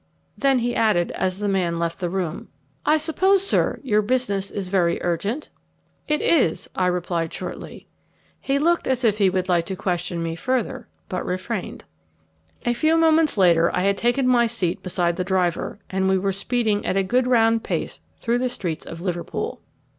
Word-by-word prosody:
Then 275 Hz, -1 st, +2 dB
he 240 Hz, 0 st, -1 dB
added, 210 Hz, -6 st, +2 dB
as 185 Hz, 0 st, -2 dB
the 205 Hz, 0 st, -2 dB
man 180 Hz, -4 st, 0 dB
left 170 Hz, 0 st, -2 dB
the 175 Hz, -2 st, -2 dB
room, 180 Hz, -2 st, -3 dB, 0.4 s
"I 305 Hz, -, +5 dB
suppose, 375 Hz, +5 st, +2 dB
sir, -, -, +1 dB
your 215 Hz, -5 st, +2 dB
business 205 Hz, -4 st, 0 dB
is 195 Hz, -2 st, -4 dB
very 180 Hz, -3 st, +1 dB
urgent?" 200 Hz, -, -2 dB, 0.6 s
"It 300 Hz, 0 st, +1 dB
is," 265 Hz, -, +2 dB
I 185 Hz, -, +1 dB
replied 175 Hz, -2 st, -1 dB
shortly. -, -, -7 dB, 0.5 s
He 275 Hz, 0 st, 0 dB
looked 335 Hz, +4 st, +1 dB
as 260 Hz, -1 st, 0 dB
if 215 Hz, -2 st, +2 dB
he 195 Hz, -2 st, +5 dB
would 185 Hz, 0 st, -1 dB
like 175 Hz, -2 st, +1 dB
to 190 Hz, -, -3 dB
question 175 Hz, -2 st, -2 dB
me 165 Hz, 0 st, -3 dB
further, 255 Hz, +6 st, -2 dB, 0.2 s
but 185 Hz, -, -3 dB
refrained. 185 Hz, +3 st, -4 dB, 0.8 s
A 240 Hz, -, +2 dB
few 315 Hz, +6 st, +2 dB
moments 320 Hz, -4 st, +3 dB
later 170 Hz, -3 st, +4 dB
I 180 Hz, -, +1 dB
had 200 Hz, +1 st, +2 dB
taken 245 Hz, +4 st, +1 dB
my 240 Hz, -2 st, +4 dB
seat 195 Hz, -7 st, -2 dB
beside 175 Hz, -2 st, 0 dB
the 180 Hz, -, 0 dB
driver, 180 Hz, -2 st, -1 dB
and 190 Hz, 0 st, 0 dB
we 190 Hz, -, +3 dB
were 195 Hz, +1 st, 0 dB
speeding 210 Hz, +1 st, 0 dB
at 190 Hz, -, -1 dB
a 195 Hz, -, +3 dB
good 250 Hz, +6 st, +1 dB
round 225 Hz, -2 st, +3 dB
pace -, -, -3 dB, 0.2 s
through 240 Hz, +1 st, 0 dB
the 255 Hz, 0 st, 0 dB
streets 180 Hz, -10 st, -4 dB
of 165 Hz, 0 st, -8 dB
Liverpool. 175 Hz, -2 st, -4 dB
195 Hz, 185 wpm, -23 LUFS, 180-245 Hz, 0.8 s, I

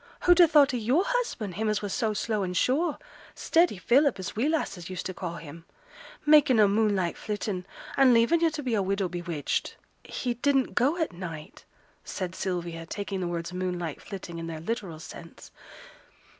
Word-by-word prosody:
Who'd 355 Hz, 0 st, +5 dB
ha' 345 Hz, -2 st, +8 dB
thought 290 Hz, -4 st, +5 dB
of 245 Hz, -, 0 dB
yo'r 250 Hz, -, +2 dB
husband, 480 Hz, -, -2 dB
him 215 Hz, +4 st, -1 dB
as 210 Hz, 0 st, -1 dB
was 205 Hz, -, -3 dB
so 220 Hz, -2 st, 0 dB
slow 215 Hz, 0 st, -1 dB
and 180 Hz, -1 st, -2 dB
sure 300 Hz, -, +1 dB, 0.4 s
steady 335 Hz, -, +2 dB
Philip, 265 Hz, +7 st, +3 dB
as 190 Hz, +1 st, -6 dB
we 245 Hz, +8 st, +1 dB
lasses 195 Hz, -, -2 dB
used 185 Hz, -2 st, -5 dB
to 185 Hz, -, -3 dB
ca' 175 Hz, -2 st, -5 dB
him 165 Hz, 0 st, -10 dB, 0.6 s
makin' 295 Hz, -4 st, +6 dB
a 210 Hz, -, +7 dB
moonlight 200 Hz, -4 st, +1 dB
flittin', 205 Hz, -3 st, -4 dB, 0.3 s
and 270 Hz, -2 st, +6 dB
leavin' 235 Hz, +8 st, +4 dB
yo' 335 Hz, 0 st, +3 dB
to 305 Hz, -2 st, -6 dB
be 250 Hz, -3 st, -1 dB
a 210 Hz, -, +2 dB
widow 195 Hz, 0 st, 0 dB
bewitched?' 175 Hz, -3 st, -3 dB, 0.3 s
'He 245 Hz, -2 st, -3 dB
didn't 270 Hz, +2 st, +1 dB
go 275 Hz, +8 st, +2 dB
at 320 Hz, -, -1 dB
night,' 165 Hz, -4 st, -8 dB, 0.4 s
said 185 Hz, -2 st, -5 dB
Sylvia, 170 Hz, -3 st, -4 dB
taking 200 Hz, 0 st, -4 dB
the 180 Hz, -, -2 dB
words 170 Hz, +1 st, -4 dB
'moonlight 180 Hz, -4 st, -3 dB
flitting' 180 Hz, -4 st, -7 dB
in 165 Hz, -, -5 dB
their 160 Hz, -1 st, -5 dB
literal 190 Hz, -3 st, -4 dB
sense. 165 Hz, +1 st, -11 dB
205 Hz, 185 wpm, -27 LUFS, 175-265 Hz, 0.6 s, ha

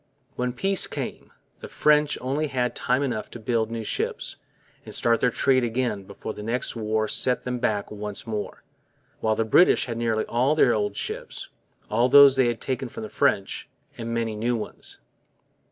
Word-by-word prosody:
When 125 Hz, 0 st, -1 dB
peace 195 Hz, +10 st, +1 dB
came, -, -, -6 dB, 0.3 s
the -, -, -8 dB
French 150 Hz, 0 st, +3 dB
only 140 Hz, +4 st, -1 dB
had 125 Hz, -3 st, -1 dB
time 130 Hz, +3 st, +1 dB
enough 120 Hz, -6 st, -3 dB
to 120 Hz, -, -9 dB
build 115 Hz, 0 st, 0 dB
new 115 Hz, -1 st, -4 dB
ships -, -, -3 dB, 0.5 s
and -, -, -3 dB
start 115 Hz, -1 st, +2 dB
their 125 Hz, -, +3 dB
trade 130 Hz, +1 st, +2 dB
again 115 Hz, -4 st, -1 dB
before 100 Hz, +2 st, -7 dB
the -, -, -9 dB
next 115 Hz, +4 st, -1 dB
war 110 Hz, -1 st, 0 dB
set 125 Hz, +3 st, +1 dB
them 125 Hz, -1 st, -3 dB
back 105 Hz, -4 st, -1 dB
once 105 Hz, -1 st, -5 dB
more; 105 Hz, -2 st, -5 dB, 0.6 s
while 110 Hz, 0 st, +1 dB
the 115 Hz, -, 0 dB
British 175 Hz, +11 st, +5 dB
had 115 Hz, -2 st, -4 dB
nearly 115 Hz, -2 st, 0 dB
all 130 Hz, +6 st, +1 dB
their 125 Hz, -6 st, +4 dB
old 105 Hz, -2 st, -1 dB
ships, -, -, -5 dB, 0.4 s
all 120 Hz, +4 st, +2 dB
those 140 Hz, 0 st, +8 dB
they 130 Hz, -2 st, +3 dB
had 120 Hz, -1 st, -1 dB
taken 130 Hz, -1 st, -3 dB
from 110 Hz, -, -8 dB
the 110 Hz, -, -6 dB
French, 100 Hz, -, 0 dB, 0.3 s
and 115 Hz, 0 st, -5 dB
many 115 Hz, -2 st, -1 dB
new 120 Hz, +3 st, 0 dB
ones. 110 Hz, -, -4 dB
120 Hz, 185 wpm, -25 LUFS, 110-130 Hz, 0.6 s, those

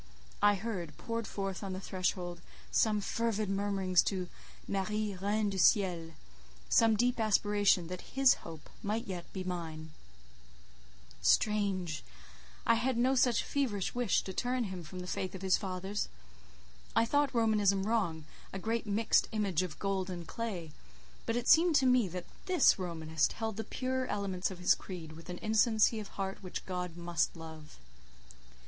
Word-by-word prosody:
I 205 Hz, 0 st, +6 dB
heard, 190 Hz, -7 st, -5 dB
poured 230 Hz, -2 st, -3 dB
forth 195 Hz, -2 st, -4 dB
on 195 Hz, -1 st, -3 dB
the 185 Hz, -, -4 dB
threshold, 180 Hz, -2 st, -2 dB, 0.3 s
some 215 Hz, -2 st, +3 dB
fervid 215 Hz, -1 st, -1 dB
murmurings 195 Hz, -2 st, +2 dB
to 185 Hz, -3 st, -2 dB, 0.4 s
"Marie, 210 Hz, +1 st, -1 dB
Reine 205 Hz, +2 st, 0 dB
du 190 Hz, -, -3 dB
Ciel," 175 Hz, -5 st, +3 dB, 0.6 s
some 225 Hz, -1 st, +5 dB
deep 245 Hz, +2 st, +2 dB
aspiration 205 Hz, -4 st, +3 dB
that 180 Hz, +2 st, -6 dB, 0.2 s
his 270 Hz, -2 st, +6 dB
hope 160 Hz, -2 st, -10 dB
might 215 Hz, +3 st, -2 dB
yet 175 Hz, -3 st, -6 dB
be 190 Hz, -, -4 dB
mine. 160 Hz, -3 st, -5 dB, 1.3 s
Strange! 195 Hz, -6 st, +2 dB, 0.6 s
I 230 Hz, -, +5 dB
had 240 Hz, +2 st, +1 dB
no 255 Hz, +3 st, +3 dB
such 245 Hz, -3 st, +3 dB
feverish 235 Hz, -9 st, -1 dB
wish 245 Hz, -4 st, +1 dB
to 190 Hz, -, -6 dB
turn 250 Hz, +4 st, 0 dB
him 185 Hz, -4 st, -5 dB
from 180 Hz, +4 st, -8 dB
the -, -, -6 dB
faith 185 Hz, 0 st, -3 dB
of 190 Hz, -, -8 dB
his 190 Hz, -1 st, +4 dB
fathers. 190 Hz, +1 st, -3 dB, 0.9 s
I 230 Hz, -, +5 dB
thought 285 Hz, +3 st, +2 dB
Romanism 210 Hz, -4 st, +3 dB
wrong, 195 Hz, -8 st, 0 dB, 0.3 s
a -, -, -5 dB
great 225 Hz, +3 st, -2 dB
mixed 210 Hz, +2 st, +3 dB
image 200 Hz, -6 st, +1 dB
of 180 Hz, -4 st, -5 dB
gold 195 Hz, -2 st, -1 dB
and 175 Hz, -2 st, -5 dB
clay; 185 Hz, -5 st, -4 dB, 0.6 s
but 230 Hz, -, 0 dB
it 240 Hz, 0 st, -2 dB
seemed 330 Hz, +1 st, +6 dB
to 270 Hz, -, +5 dB
me 250 Hz, -4 st, +4 dB
that 180 Hz, 0 st, -6 dB, 0.2 s
this 365 Hz, -, +5 dB
Romanist 160 Hz, -3 st, -1 dB
held 220 Hz, -2 st, -3 dB
the 220 Hz, -, -3 dB
purer 260 Hz, +1 st, -2 dB
elements 195 Hz, -4 st, -1 dB
of 190 Hz, -, -8 dB
his 180 Hz, -, +4 dB
creed 170 Hz, -4 st, -7 dB
with 165 Hz, +2 st, -12 dB
an 180 Hz, -, -4 dB
innocency 220 Hz, +1 st, +3 dB
of 210 Hz, -, -6 dB
heart 195 Hz, 0 st, -5 dB
which 185 Hz, -2 st, -6 dB
God 180 Hz, -2 st, -4 dB
must 170 Hz, -2 st, 0 dB
love. 160 Hz, -2 st, -10 dB
195 Hz, 160 wpm, -32 LUFS, 180-225 Hz, 1.3 s, I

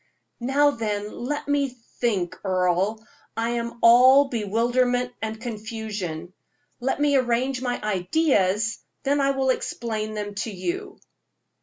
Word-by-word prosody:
"Now, 280 Hz, +4 st, +3 dB
then, 210 Hz, -4 st, -3 dB
let 290 Hz, +5 st, -4 dB
me 285 Hz, -1 st, +1 dB, 0.3 s
think, 200 Hz, -8 st, 0 dB
Earle; 190 Hz, +3 st, 0 dB, 0.3 s
I 230 Hz, +1 st, 0 dB
am 235 Hz, 0 st, -3 dB
all 260 Hz, +4 st, +7 dB
bewilderment 245 Hz, +3 st, +1 dB
and 220 Hz, 0 st, -4 dB
confusion. 215 Hz, -7 st, -5 dB, 0.5 s
Let 265 Hz, +2 st, -1 dB
me 290 Hz, -1 st, +3 dB
arrange 255 Hz, +1 st, 0 dB
my 245 Hz, -1 st, -2 dB
ideas, 210 Hz, -, +1 dB, 0.2 s
then 285 Hz, +1 st, +2 dB
I 275 Hz, -, +3 dB
will 270 Hz, -1 st, +2 dB
explain 220 Hz, -3 st, -3 dB
them 205 Hz, -1 st, -4 dB
to -, -, -3 dB
you." 355 Hz, -, -4 dB
235 Hz, 125 wpm, -24 LUFS, 210-265 Hz, 0.5 s, all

